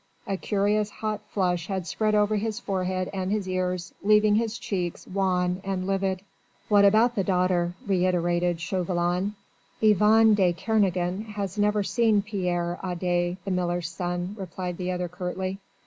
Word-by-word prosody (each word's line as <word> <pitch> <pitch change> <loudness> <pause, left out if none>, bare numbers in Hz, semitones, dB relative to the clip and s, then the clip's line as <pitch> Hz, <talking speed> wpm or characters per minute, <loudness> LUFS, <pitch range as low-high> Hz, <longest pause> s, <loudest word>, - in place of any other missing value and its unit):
A 195 - -1
curious 205 +2 0
hot 215 0 -4
flush 180 -3 0
had 190 -3 -3
spread 215 +3 0
over 210 0 +3
his 220 +1 -2
forehead 185 -3 -2
and 190 -1 -2
his 205 -2 -1
ears, 185 -1 -2
leaving 210 0 +4
his 225 +1 0
cheeks 180 -4 -3
wan 185 -1 0
and 190 -1 -2
livid. 195 -1 -1 0.5
"What 205 -1 +6
about 220 +4 +5
the 200 - 0
daughter?" 180 -2 +1
reiterated 175 -2 +1
Chauvelin. 180 +2 -1 0.4
"Yvonne 215 +1 +5
de 185 -4 +3
Kernogan 190 -1 0
has 200 0 -3
never 210 0 +2
seen 220 -1 +2
Pierre 180 -4 -2
Adet 175 -1 -1
the 195 - -2
miller's 175 -2 -1
son," 175 +2 -3
replied 180 -1 -5
the 185 0 -2
other 180 0 -2
curtly. 185 +2 -4
185 Hz, 150 wpm, -26 LUFS, 180-205 Hz, 0.5 s, What